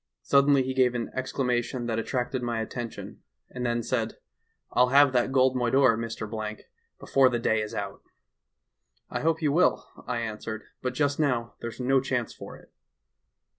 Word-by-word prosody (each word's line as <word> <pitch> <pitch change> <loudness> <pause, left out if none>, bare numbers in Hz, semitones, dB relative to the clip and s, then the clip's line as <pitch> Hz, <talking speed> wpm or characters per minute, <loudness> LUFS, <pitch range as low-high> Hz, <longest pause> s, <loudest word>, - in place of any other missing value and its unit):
Suddenly 140 -1 +4
he 130 +1 -3
gave 125 -2 +3
an 120 - -3
exclamation 125 -2 -1
that 115 -1 -1
attracted 125 +2 -2
my 120 -2 -2
attention, 115 +1 -6 0.3
and 125 - -5
then 120 -1 0
said: 115 -2 -2 0.5
'"I'll 125 - +4
have 140 0 +6
that 125 +1 +2
gold 130 -1 +3
moidore, 125 0 +4
Mr., 110 -1 -5 0.4
before 135 -1 +4
the 120 - 0
day 110 -2 +1
is 105 - -5
out.' - - -5 1.1
"'I - - -2
hope 160 +1 +1
you 150 - +3
will,' 170 +5 +3 0.2
I 125 -1 -1
answered, 110 -1 -5 0.2
'but 125 0 -3
just 145 +1 +1
now 125 -6 0
there's 115 +1 -6
no 130 +1 +3
chance 125 -3 -2
for - - -10
it. - - -20
125 Hz, 165 wpm, -27 LUFS, 115-130 Hz, 1.1 s, have